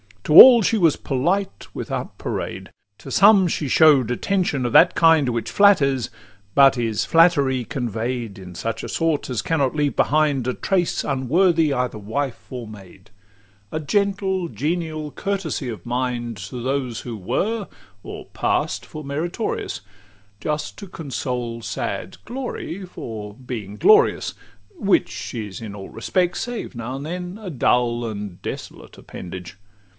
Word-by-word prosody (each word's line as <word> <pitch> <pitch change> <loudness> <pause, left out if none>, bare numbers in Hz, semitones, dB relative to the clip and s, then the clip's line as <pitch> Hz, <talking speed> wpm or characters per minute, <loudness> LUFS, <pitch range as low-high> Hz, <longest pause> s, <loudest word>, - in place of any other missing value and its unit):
XXXII 150 - +4
To - - +16
all 245 -3 +7
she 225 - +2
was 165 -5 +4
polite 180 +9 -1
without - - -5
parade; - - -5 0.3
To - - -10
some 195 -4 +6
she 155 -3 -2
show'd 140 -3 +5
attention 145 -1 0
of 120 - -1
that 170 - +6
kind 165 -5 +5
Which 115 -1 -3
flatters, 140 - +4 0.5
but 135 -1 +6
is 115 -3 -1
flattery 140 -7 +3
convey'd 120 -3 -3
In 90 -2 -10
such 115 +6 -4
a - - -5
sort 165 -4 0
as 125 -3 -2
cannot 145 -5 0
leave 145 -2 0
behind 145 -4 +2
A 125 - 0
trace 180 +3 0
unworthy 155 +4 +2
either 125 -3 -1
wife 120 +5 -4
or 125 -3 -6
maid; 95 -1 -14 0.6
A 155 - -2
gentle, 190 +2 0
genial 155 -1 -3
courtesy 195 -9 -3
of 110 - -7
mind, 120 -2 -2
To 105 +7 -7
those 130 -3 -2
who 120 -3 -6
were, 205 - -2 0.3
or - - -8
pass'd - - -1
for 155 - -9
meritorious, 165 - -3 0.6
Just 150 +4 -3
to 200 - -8
console 125 -7 -4
sad - - -4
glory 235 -6 -5
for 110 - -7
being 115 -5 -7
glorious; 430 - +4 0.4
XXXIII - - -13
Which 190 -2 +1
is 105 -4 -6
in 105 -3 -7
all 95 -1 -9
respects, 180 -2 -1
save 240 -9 -5
now 120 +2 -5
and 140 +2 -6
then, 180 +3 -5
A 200 - -6
dull 120 -4 +1
and 100 -4 -7
desolate - - -8
appendage. 90 +1 -9
140 Hz, 150 wpm, -22 LUFS, 120-175 Hz, 0.6 s, To